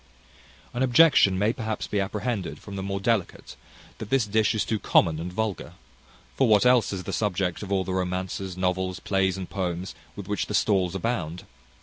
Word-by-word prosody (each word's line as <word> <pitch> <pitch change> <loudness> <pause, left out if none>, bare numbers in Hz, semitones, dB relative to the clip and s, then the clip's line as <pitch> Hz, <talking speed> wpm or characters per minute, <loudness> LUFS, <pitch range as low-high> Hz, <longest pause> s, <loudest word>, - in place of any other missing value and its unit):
An 120 - -3
objection 130 - +5
may 105 +4 +2
perhaps 110 -3 -3
be 105 - -2
apprehended 100 - -2
from 100 +5 -10
the 95 - -4
more 100 0 -3
delicate, 105 -2 -1 0.4
that 110 - -7
this 135 -4 +2
dish 110 +1 +1
is 110 - 0
too 110 - -1
common 80 -6 +3
and 85 +2 -5
vulgar; 105 -1 -3 0.6
for 135 - +3
what 105 0 +4
else 125 -3 +4
is 95 -2 -4
the - - -5
subject 95 -4 -1
of 100 -2 -7
all 95 -1 +2
the 95 - -4
romances, 95 0 -3
novels, 95 0 -1
plays, 95 -1 0
and 95 -2 -5
poems, 90 -1 -3 0.2
with 100 -2 -8
which 105 0 -2
the 105 - -2
stalls 95 -4 +2
abound? 90 -6 -2
100 Hz, 190 wpm, -26 LUFS, 95-110 Hz, 0.6 s, objection